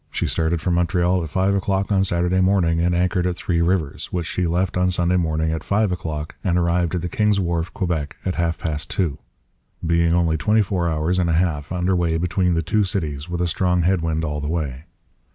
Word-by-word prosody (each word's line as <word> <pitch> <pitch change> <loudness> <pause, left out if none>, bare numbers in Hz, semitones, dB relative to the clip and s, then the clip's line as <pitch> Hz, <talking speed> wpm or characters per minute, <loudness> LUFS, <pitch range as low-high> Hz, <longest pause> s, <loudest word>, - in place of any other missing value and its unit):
She - - -2
started 80 0 0
from 90 - 0
Montreal 90 +1 +2
at 80 - -5
5 95 +4 +1
o'clock 95 0 0
on 95 -1 +3
Saturday 90 0 +1
morning, 90 -3 +2
and 85 +1 +1
anchored 90 +1 +1
at 90 - -1
Three 85 -1 -1
Rivers, 85 -4 0
which 85 -2 -2
she 90 +1 -1
left 90 +2 0
on 90 0 +2
Sunday 90 0 +2
morning 80 -2 0
at 80 -1 -3
5 105 -1 +1
o'clock, 80 -4 -4
and 90 -3 +1
arrived 85 0 +1
at 90 - -2
the - - -1
King's 105 +3 +1
Wharf, 85 -2 -1
Quebec, 80 -5 -2
at 95 - 0
half 85 -2 -1
past 75 -2 -4
two; 85 -8 -1 0.7
being 85 0 +2
only 85 -2 +2
24 95 -1 +1
hours 80 +3 0
and 85 -2 +1
a - - +2
half 80 -4 0
under 90 +1 +1
way 85 -2 +1
between 90 +1 +1
the 80 - 0
two 105 +6 +1
cities, 80 -5 -3
with 90 0 -2
a 90 - +1
strong 90 +1 +1
head 90 0 +2
wind 80 0 -1
all 75 -1 -3
the 75 - -3
way. 75 -4 -3
85 Hz, 220 wpm, -22 LUFS, 80-90 Hz, 0.7 s, on